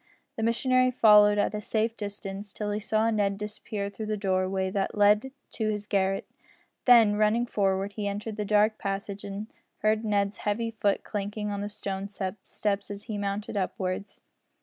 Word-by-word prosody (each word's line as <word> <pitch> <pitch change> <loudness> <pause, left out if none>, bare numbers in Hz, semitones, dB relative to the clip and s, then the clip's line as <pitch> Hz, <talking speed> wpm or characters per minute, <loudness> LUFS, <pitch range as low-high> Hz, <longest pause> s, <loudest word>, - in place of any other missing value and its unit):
The - - -4
missionary 255 +3 +3
followed 210 -4 +6
at 205 - +1
a 210 - -3
safe 225 +2 0
distance 205 -1 -6
till 210 +1 -3
he 205 - -1
saw 220 +1 +1
Ned 200 -2 +1
disappear 210 0 -4
through 210 +2 -6
the 215 0 -1
doorway 190 -1 0
that 195 +1 -2
led 210 +5 +4 0.2
to 220 -2 -1
his 210 -1 -2
garret. 195 -2 0 0.6
Then, 230 -4 +7
running 215 +3 +3
forward, 195 -2 0
he 205 -1 -3
entered 205 +2 -4
the 210 - -2
dark 210 +1 +3
passage 195 0 -4
and 200 +1 -5 0.4
heard 215 +1 +2
Ned's 200 -2 0
heavy 225 +2 -1
foot 205 -3 0
clanking 210 0 -3
on 200 0 -3
the 205 - -3
stone 200 -1 -4
steps 200 +1 -3
as 205 0 -7
he 210 -1 -4
mounted 200 +2 -3
upwards. 190 0 -3
205 Hz, 170 wpm, -28 LUFS, 200-215 Hz, 0.6 s, Then